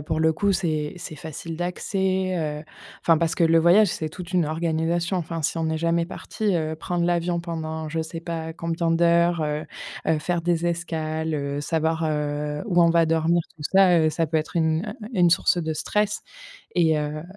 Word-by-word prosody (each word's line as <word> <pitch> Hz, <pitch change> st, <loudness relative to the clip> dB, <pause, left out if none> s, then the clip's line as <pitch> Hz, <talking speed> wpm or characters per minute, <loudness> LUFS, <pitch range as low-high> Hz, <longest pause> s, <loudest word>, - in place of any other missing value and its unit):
pour 155 Hz, +2 st, -2 dB
le 160 Hz, 0 st, +3 dB
coup, 200 Hz, +5 st, +1 dB
c'est 155 Hz, -4 st, -1 dB
c'est 170 Hz, -2 st, -8 dB
facile 160 Hz, +2 st, -7 dB
d'accès, 185 Hz, +1 st, -1 dB
heu, 150 Hz, -1 st, -3 dB, 0.4 s
enfin 165 Hz, -2 st, +4 dB
parce 170 Hz, 0 st, 0 dB
que 170 Hz, -, +3 dB
le 165 Hz, 0 st, +5 dB
voyage, 180 Hz, +5 st, +6 dB
c'est 155 Hz, -1 st, -3 dB
toute 180 Hz, +2 st, -9 dB
une 175 Hz, -4 st, +2 dB
organisation. 165 Hz, +2 st, 0 dB
Enfin 165 Hz, -1 st, -4 dB
si 165 Hz, -, -1 dB
on 160 Hz, -, 0 dB
est 160 Hz, -, -1 dB
jamais 170 Hz, +1 st, +1 dB
parti, 210 Hz, +1 st, -2 dB
heu, 160 Hz, -1 st, -1 dB
prendre 175 Hz, +2 st, -2 dB
l'avion 175 Hz, 0 st, +1 dB
pendant 160 Hz, -2 st, -4 dB
je 165 Hz, +1 st, -1 dB
sais 165 Hz, +1 st, -6 dB
pas 160 Hz, -1 st, -5 dB
combien 165 Hz, 0 st, -1 dB
d'heures, 170 Hz, 0 st, +3 dB
heu, 150 Hz, 0 st, -2 dB, 0.4 s
heu, 160 Hz, -, +2 dB
faire 175 Hz, +3 st, -1 dB
des 170 Hz, 0 st, 0 dB
escales, 160 Hz, -2 st, -2 dB
heu, 140 Hz, 0 st, -2 dB
savoir, 160 Hz, +1 st, 0 dB
heu, 150 Hz, -1 st, -2 dB
où 175 Hz, -4 st, +3 dB
on 170 Hz, -, +5 dB
va 170 Hz, 0 st, +4 dB
dormir. 165 Hz, +1 st, +2 dB
Tout 150 Hz, -, -10 dB
ça, 185 Hz, -3 st, +6 dB
heu, 155 Hz, -1 st, +3 dB
ça 160 Hz, +1 st, 0 dB
peut 160 Hz, +1 st, +1 dB
être 155 Hz, +2 st, -5 dB
une, 160 Hz, +3 st, +1 dB, 0.2 s
heu, 210 Hz, -, -6 dB
une 180 Hz, -4 st, +4 dB
source 175 Hz, +1 st, +3 dB
de 160 Hz, 0 st, -2 dB
stress 210 Hz, +5 st, -1 dB, 0.5 s
et 160 Hz, -3 st, +3 dB
heu, 150 Hz, +1 st, -3 dB
165 Hz, 200 wpm, -24 LUFS, 155-175 Hz, 0.5 s, voyage